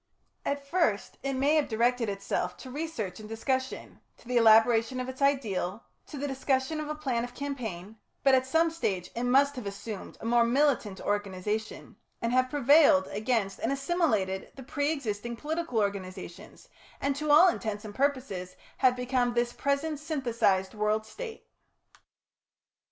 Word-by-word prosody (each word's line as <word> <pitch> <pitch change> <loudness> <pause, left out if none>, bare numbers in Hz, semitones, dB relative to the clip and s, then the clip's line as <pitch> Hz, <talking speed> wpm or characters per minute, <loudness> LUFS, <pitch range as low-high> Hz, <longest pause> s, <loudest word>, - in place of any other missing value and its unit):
At 280 0 -2
first 280 - 0
it 275 0 -2
may 275 +3 +2
have 300 - +2
directed 235 0 +1
itself 200 0 -2
to 260 - -10
research 265 - -4
and 215 0 -10
discussion, 260 +4 -3 0.2
to - - -19
the 250 - -2
elaboration 225 +2 +5
of 255 - -3
its 260 +1 -8
ideal, 230 -7 0 0.2
to 295 - -8
the 285 +1 -2
discussion 270 +2 0
of 305 -1 -4
a 305 - -2
plan 260 -6 -1
of 245 0 -7
campaign, 225 -8 -5 0.3
but 270 - +5
at 260 0 +3
some 325 +4 +3
stage 195 - -2
it 235 - -2
must 280 +3 +4
have 235 -5 -5
assumed 200 +1 -7
a - - -9
more 235 0 +4
militant 240 -5 +1
organisation, 205 +1 -3 0.2
and 230 +1 -1
have 255 0 +3
prevailed 280 -8 +5
against 210 -2 -1
and 230 - -1
assimilated 270 - 0
the 265 - -9
pre 285 +4 -1
existing 235 -5 -3
political 310 0 -3
organisations, 190 -4 -4 0.3
and 280 0 0
to 300 +2 -3
all 310 +5 +8
intents 215 - -2
and 210 - -7
purposes 255 -9 -1 0.2
have 255 -1 +4
become 250 -1 0
this 240 0 +1
present 280 +2 -1
synthesised 235 - 0
World 215 0 0
State. 450 - -8
245 Hz, 160 wpm, -29 LUFS, 215-280 Hz, 0.3 s, all